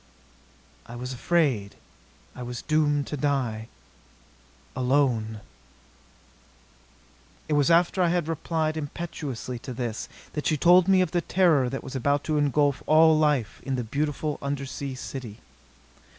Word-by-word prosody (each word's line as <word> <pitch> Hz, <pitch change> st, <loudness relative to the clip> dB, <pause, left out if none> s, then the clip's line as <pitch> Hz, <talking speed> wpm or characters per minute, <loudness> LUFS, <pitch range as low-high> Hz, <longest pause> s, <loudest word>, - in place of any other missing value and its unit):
"I 120 Hz, -, -9 dB
was 125 Hz, +2 st, -5 dB
afraid... 125 Hz, -8 st, 0 dB, 0.6 s
I -, -, -8 dB
was 120 Hz, -1 st, -6 dB
doomed 150 Hz, -2 st, +1 dB
to 150 Hz, -, -5 dB
die... 125 Hz, -6 st, -1 dB, 1.1 s
alone...." 125 Hz, -5 st, +1 dB, 2.1 s
It 155 Hz, -, -1 dB
was 145 Hz, 0 st, +3 dB
after 175 Hz, +2 st, +3 dB
I 175 Hz, -, +4 dB
had 175 Hz, -2 st, 0 dB
replied 160 Hz, -1 st, -1 dB
impetuously 145 Hz, -5 st, -5 dB
to 130 Hz, -, -7 dB
this, 115 Hz, -3 st, -4 dB, 0.2 s
that 150 Hz, -, -2 dB
she 155 Hz, -, +2 dB
told 175 Hz, +4 st, +6 dB
me 190 Hz, -1 st, +5 dB
of 180 Hz, -4 st, 0 dB
the 175 Hz, -, +1 dB
terror 165 Hz, -9 st, +3 dB
that 135 Hz, +1 st, -5 dB
was 135 Hz, -, -8 dB
about 140 Hz, +3 st, +1 dB
to 155 Hz, -2 st, 0 dB
engulf 145 Hz, -1 st, +2 dB
all 160 Hz, +1 st, +6 dB
life 145 Hz, -7 st, +1 dB
in 135 Hz, -, -2 dB
the 125 Hz, -, -2 dB
beautiful 145 Hz, +4 st, -2 dB
undersea 140 Hz, -1 st, -4 dB
city. 125 Hz, -4 st, -7 dB
145 Hz, 135 wpm, -26 LUFS, 125-155 Hz, 2.1 s, told